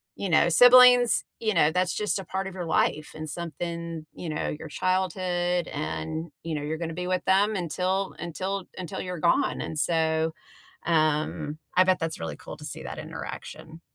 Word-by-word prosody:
you 195 - -3
know, 165 +1 +5
siblings, 245 +4 +7 0.2
you 220 -2 0
know, 160 -3 +4
that's 180 +1 +1
just 210 -1 -1
a 195 - -5
part 190 +2 -3
of 195 - -7
your 180 -2 -5
life 155 -2 0
and 155 0 -6
something, 170 0 -5
you 170 - -6
know, 155 - -2
your 160 - -8
childhood 180 -1 0
and, 160 +2 -4
you 165 -2 -3
know, 145 - -3
you're 155 +2 -3
gonna 165 0 -4
be 180 +1 -4
with 185 0 0
them 200 +3 +3
until 185 +2 -1
until 185 +3 -3
until 180 -4 -5
you're 180 -2 -5
gone. 180 - +2
And 160 - -5
so, 160 0 +1 0.5
um, 155 -2 +1 0.2
I 185 - +7
bet 185 -1 +2
that's 165 -1 -3
really 80 0 -4
cool - - -9
to - - -12
see - - -6
that - - -6
interaction. 160 +1 -8
170 Hz, 185 wpm, -26 LUFS, 160-185 Hz, 0.5 s, siblings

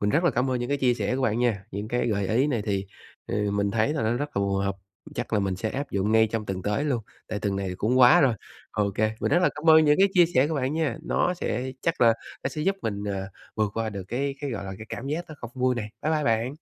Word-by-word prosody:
mình 105 0 +1
rất 165 +4 +2
là 175 - +5
cảm 125 +1 0
ơn 125 -1 0
những 120 - -3
cái 140 0 0
chia 125 -2 +3
sẻ 125 - -1
của 135 - -2
bạn 115 -2 +1
nha, 110 -6 0
những 100 +3 -5
cái 120 0 0
gợi 100 -3 0
ý 125 +6 +3
này 120 -8 0
thì, 100 -2 -2 0.4
ừ, 105 -1 -1
mình 100 0 0
thấy 115 +7 +1
là 150 - -1
nó 110 - +1
rất 145 +4 -2
là 100 - +2
phù 100 0 0
hợp, 100 0 -1 0.4
chắc - - -4
là 105 - +3
mình 95 -2 -1
sẽ 110 +3 -2
áp 140 +1 -4
dụng 100 +2 0
ngay 110 0 +5
trong 110 -2 -2
tuần 95 -1 -3
tới 105 +8 0
luôn, 125 -7 0 0.3
tại 105 - -3
tuần 100 -2 -1
này 95 -1 -2
cũng 125 +6 +1
quá 125 -1 +8
rồi. 130 -5 +4 0.4
Ô 100 -1 0
kê, 110 +1 +1
mình - - 0
rất 175 - +5
là - - +5
cám 160 +2 +3
ơn 160 0 +8
những 150 +2 +4
cái 195 - +6
chia 175 -2 +7
sẻ 130 +3 +5
của 160 - -2
bạn 135 -1 0
nha, 155 -8 0
nó 180 - +1
sẽ 130 -6 -3
chắc 165 - 0
là 120 - +7 0.3
nó - - 0
sẽ 150 +3 -4
giúp 195 +2 +1
mình, 100 -2 -3
à, 95 -1 -3 0.3
vượt 110 -2 0
qua 115 -1 -1
được 100 -2 -6
cái 135 +4 -1
cái, 145 - -3
gọi 115 -5 -4
là, 95 - -5
cái 110 - -9
cảm 130 - -6
giác 160 +5 -2
nó 155 - -8
không 120 - -7
vui 130 0 +1
này. 110 -3 -4
Bye 155 +2 +1
bye 150 -2 +1
bạn. 115 +4 +1
120 Hz, 305 wpm, -26 LUFS, 105-140 Hz, 0.4 s, quá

